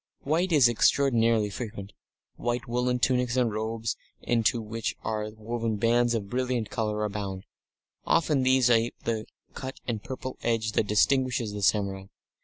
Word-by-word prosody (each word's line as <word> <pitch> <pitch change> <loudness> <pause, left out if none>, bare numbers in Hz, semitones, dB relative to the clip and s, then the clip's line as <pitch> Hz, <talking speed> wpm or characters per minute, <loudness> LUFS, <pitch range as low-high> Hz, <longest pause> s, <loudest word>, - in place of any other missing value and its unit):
White 170 +6 +1
is 145 -6 +6
extraordinarily 115 -3 +3
frequent; 105 -3 -6 0.4
white 120 0 -2
woollen 125 +1 0
tunics 125 0 +1
and 120 -4 +2
robes 110 +1 -2 0.2
into 115 0 +1
which 115 0 -4
are 110 -1 -2
woven 115 0 -2
bands 120 +2 +2
of 105 -3 -3
brilliant 125 -1 -1
colour, 105 -1 -1
abound. 100 -2 -4 0.6
Often 150 -4 +3
these 130 -1 +4
ape 115 0 +2
the 110 -2 -2 0.3
cut 130 0 -7
and 115 -4 -2
purple 130 0 -6
edge 115 -2 0
that 105 - +1
distinguishes 120 0 +2
the 105 - -5
samurai. 95 -1 +1
115 Hz, 145 wpm, -27 LUFS, 105-125 Hz, 0.6 s, is